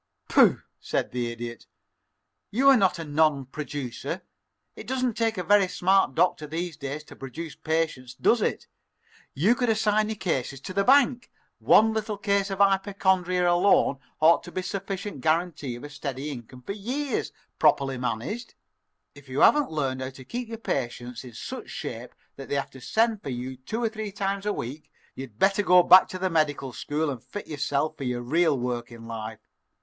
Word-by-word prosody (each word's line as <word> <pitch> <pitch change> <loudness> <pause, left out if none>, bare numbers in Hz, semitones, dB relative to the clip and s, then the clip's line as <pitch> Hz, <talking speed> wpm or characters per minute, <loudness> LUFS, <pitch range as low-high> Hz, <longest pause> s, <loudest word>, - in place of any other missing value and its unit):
"Pooh!" - - +5 0.2
said - - -2
the 120 -1 -2
Idiot. 120 0 -7 0.8
"You 265 +6 +4
are 275 - +8
not 195 -7 +3
a 165 - -5
non 150 -2 +2
producer. 140 -3 -5 0.5
It - - -10
doesn't 255 -1 0
take 225 -1 0
a 180 - -2
very 200 +1 +4
smart 190 -6 +2
doctor 150 - +2
these 165 +2 -4
days 140 +2 -5
to - - -14
produce 140 +4 -7
patients, 155 -5 -2
does - - +3
it? - - -1 0.7
You 185 - +4
could 245 -1 0
assign 215 -1 +2
your 220 - -2
cases 135 - -2
to 185 - -7
the 200 +1 +2
bank. 255 -1 +4 0.3
One 220 +1 +5
little 215 -1 -2
case 200 -1 +1
of 195 - -3
hypochondria 190 -2 +2
alone 175 -6 +3 0.2
ought 160 +2 +5
to 175 - -9
be 185 - -2
a - - -10
sufficient 195 -4 -5
guarantee 155 -4 0
of 120 - -10
a 145 - -7
steady 140 0 -5
income 125 -1 -10
for 200 - -4
years, 255 +8 -3 0.3
properly 135 -2 +3
managed. 130 - -4 0.6
If 140 -2 -16
you 130 +2 -1
haven't 295 -2 +5
learned 135 -4 -2
how 130 - -3
to 130 -1 -13
keep 245 - -5
your 225 0 -6
patients 120 - -4
in 125 -2 -11
such 255 - -7
shape 125 -10 -6 0.2
that 135 - -9
they - - 0
have 140 - -2
to 130 - -13
send 220 - +1
for 140 - -6
you 130 +1 -4
two 215 - -4
or 225 - +2
three 215 -2 -5
times 200 0 -2
a - - +2
week, 135 +6 -7 0.2
you'd 130 -6 -9
better 195 - +3
go 180 -2 +6
back 185 +2 +8
to 185 - -6
the 185 0 -1
medical 145 -5 0
school 150 +3 -2
and 125 -4 -7
fit 205 - -7
yourself 145 0 -1
for - - -6
your 125 -1 -2
real 155 +3 +2
work 120 -1 -3
in 115 -1 -11
life. 110 -1 -7
160 Hz, 190 wpm, -26 LUFS, 130-200 Hz, 0.8 s, are